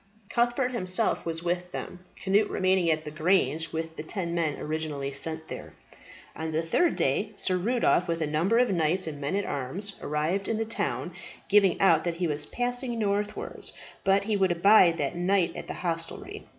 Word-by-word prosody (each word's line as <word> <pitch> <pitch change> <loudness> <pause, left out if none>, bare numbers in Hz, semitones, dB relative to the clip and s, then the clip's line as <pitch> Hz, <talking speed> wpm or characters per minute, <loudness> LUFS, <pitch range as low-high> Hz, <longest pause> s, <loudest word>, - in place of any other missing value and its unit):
Cuthbert 240 +2 +1
himself 185 -4 0
was 165 0 -2
with 180 +1 -2
them, 180 - -6 0.3
Cnut 205 +2 +3
remaining 185 -2 +2
at 155 -1 0
the 150 - -5
grange 160 -1 +1
with 160 0 -4
the - - -3
ten 170 0 -3
men 165 -4 0
originally 150 -3 -3
sent 160 +2 -3
there. - - -8 0.6
On 160 +1 -4
the 160 +1 0
third 300 - +2
day 200 +11 0
Sir 185 -2 +1
Rudolph, 190 -2 +2
with 165 0 -1
a 160 - 0
number 165 +9 +1
of 245 -3 +3
knights 175 +1 +1
and 150 -3 -6
men 145 +7 -1
at 200 - 0
arms, 180 +10 -3
arrived 155 +7 -1
in 225 - 0
the 225 - -1
town, 225 - -2 0.4
giving 200 -3 +4
out 165 -5 +5
that 170 -1 -1
he 175 +1 -1
was 150 -2 0
passing 245 0 -2
northwards, 205 -1 -2 0.3
but 195 +1 +3
he 215 +1 0
would 190 -2 +2
abide 175 -1 +6
that 140 0 -1
night 180 0 +1
at - - -7
the - - -5
hostelry. 170 - -4
180 Hz, 190 wpm, -27 LUFS, 160-200 Hz, 0.6 s, abide